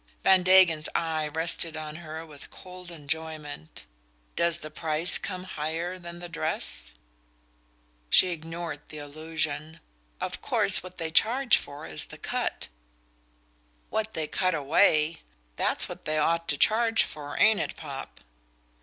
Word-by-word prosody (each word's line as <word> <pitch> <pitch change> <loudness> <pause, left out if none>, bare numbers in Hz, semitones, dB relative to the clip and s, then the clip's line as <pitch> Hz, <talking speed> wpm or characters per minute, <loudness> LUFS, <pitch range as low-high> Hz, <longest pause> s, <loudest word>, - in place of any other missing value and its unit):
Van 190 -1 +6
Degen's 180 -4 +5
eye 160 -2 -1
rested 160 +1 +3
on 155 0 -6
her 160 -1 -8
with 150 -3 -12
cold 180 -1 -11
enjoyment. 155 - -6 0.5
"Does 170 0 +3
the 155 - -5
price 160 +2 +2
come 185 -2 -5
higher 170 +1 -4
than 170 -1 -8
the 175 0 -8
dress?" 155 - -4 1.2
She 185 - +6
ignored 165 -2 -6
the 155 - -9
allusion. 155 +1 -3 0.4
"Of - - -3
course - - +4
what 185 0 -11
they 165 -2 -4
charge 240 +8 +4
for 145 0 -6
is 80 -2 -1
the - - -12
cut - - -3 0.6
" - - -38
"What 220 0 -2
they 160 - -1
cut 185 +3 0
away? 155 +2 +3 0.3
That's - - +4
what - - -10
they 155 0 0
ought 165 +2 +1
to 145 - +1
charge 225 +4 +3
for, 145 -1 -7
ain't 215 -1 +5
it, - - -3
Popp?" 140 -4 -8
160 Hz, 145 wpm, -27 LUFS, 150-175 Hz, 1.2 s, Van